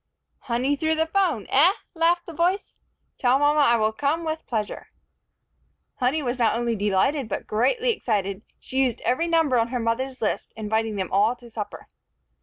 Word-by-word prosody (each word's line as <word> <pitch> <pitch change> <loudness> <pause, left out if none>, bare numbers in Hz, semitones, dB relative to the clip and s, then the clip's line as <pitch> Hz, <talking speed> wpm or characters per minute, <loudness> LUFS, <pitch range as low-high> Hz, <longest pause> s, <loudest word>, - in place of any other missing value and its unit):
"Honey, 255 +3 0
through 315 +2 0
the 320 0 +1
phone, 325 - 0
eh?" 320 +8 +5 0.2
laughed 340 +1 +2
the 335 - -9
voice. 355 +5 0 0.5
"Tell 255 +1 +4
mama 290 +1 +3
I 260 -5 +5
will 220 -1 +2
come 290 +7 -1
with 315 0 -4
pleasure." 215 -4 -3 1.1
Honey 270 +4 0
was 250 0 -2
not 230 -1 +2
only 235 -1 0
delighted, 210 +6 +1
but - - -4
greatly 475 - +1
excited. 200 - -2 0.2
She 265 - -4
used 255 -4 +1
every 295 +7 0
number 325 -7 +3
on 230 - +1
her 250 +1 -3
mother's 255 +3 -2
list, 215 - -2
inviting 220 0 -1
them 190 -2 -3
all 210 +5 +3
to 240 -1 -15
supper. 215 -2 -6
255 Hz, 175 wpm, -24 LUFS, 225-315 Hz, 1.1 s, eh